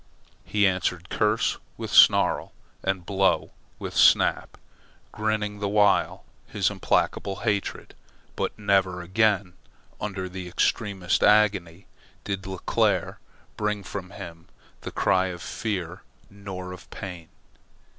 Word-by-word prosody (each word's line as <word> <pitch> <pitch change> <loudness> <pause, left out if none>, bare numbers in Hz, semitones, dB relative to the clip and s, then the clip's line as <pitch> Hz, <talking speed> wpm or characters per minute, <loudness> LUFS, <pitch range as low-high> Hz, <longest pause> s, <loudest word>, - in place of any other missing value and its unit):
He 105 -1 +1
answered 90 -1 0
curse 105 +1 +1 0.2
with - - -6
snarl, - - +5 0.3
and 95 -2 -2
blow 95 0 +1 0.3
with - - -7
snap, - - +4 0.5
grinning 105 -1 -2
the 100 -1 -1
while 105 -1 +2 0.2
his - - 0
implacable 100 -1 0
hatred; 105 -3 -2 0.4
but - - -3
never 95 -3 +1
again, 100 0 +1 0.5
under 95 -3 -3
the 90 0 -7
extremest 95 0 0
agony, 100 -4 +3 0.4
did 95 -2 -4
Leclere 95 -1 0 0.4
bring 105 -1 -1
from 95 -1 -6
him 85 -5 -10 0.3
the - - -5
cry 95 0 +2
of 90 -1 -6
fear 95 -3 -4 0.3
nor 95 -2 -7
of 90 - -11
pain. 90 -4 -8
95 Hz, 115 wpm, -25 LUFS, 90-105 Hz, 0.5 s, snarl